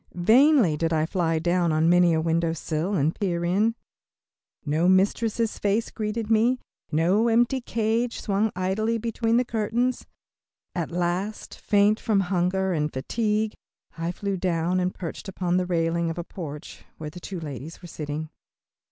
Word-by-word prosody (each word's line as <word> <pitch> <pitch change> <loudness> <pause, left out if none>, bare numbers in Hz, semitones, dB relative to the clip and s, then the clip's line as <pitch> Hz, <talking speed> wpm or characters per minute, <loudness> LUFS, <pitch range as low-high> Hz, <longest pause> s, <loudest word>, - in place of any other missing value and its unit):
Vainly 225 - +5
did 165 +1 0
I 155 -1 +2
fly 165 -2 0
down 175 +1 +1
on 155 +1 +2
many 175 0 +5
a 160 - +2
window 165 0 +1
sill 165 +4 -2
and 155 0 +1
peer 175 -4 -1
in. 210 +6 +2 0.9
No 155 +4 +1
mistress' 215 +4 +1
face 210 +3 0
greeted 215 0 -3
me, 230 +3 +3 0.3
no 180 +9 +3
empty 240 +3 +2
cage 230 +1 -1
swung 210 +1 0
idly 205 +5 0
between 230 0 0
the 250 - +2
curtains. 235 +3 -1 0.7
At 170 -3 -2
length, 180 +4 -2
faint 205 +1 +2
from 210 -3 +2
hunger 185 +1 +1
and 150 -2 -1
fatigue, 215 - -1 0.4
I 165 +1 -2
flew 200 +1 -3
down 175 0 0
and 180 0 0
perched 180 +2 -7
upon 180 -2 -1
the 180 -1 0
railing 170 -1 0
of 165 - -4
a 175 - -3
porch 150 -5 -8
where 155 -1 -6
two 180 +2 -7
ladies 150 +2 -8
were - - -8
sitting. 155 -1 -5
185 Hz, 155 wpm, -25 LUFS, 165-215 Hz, 0.9 s, Vainly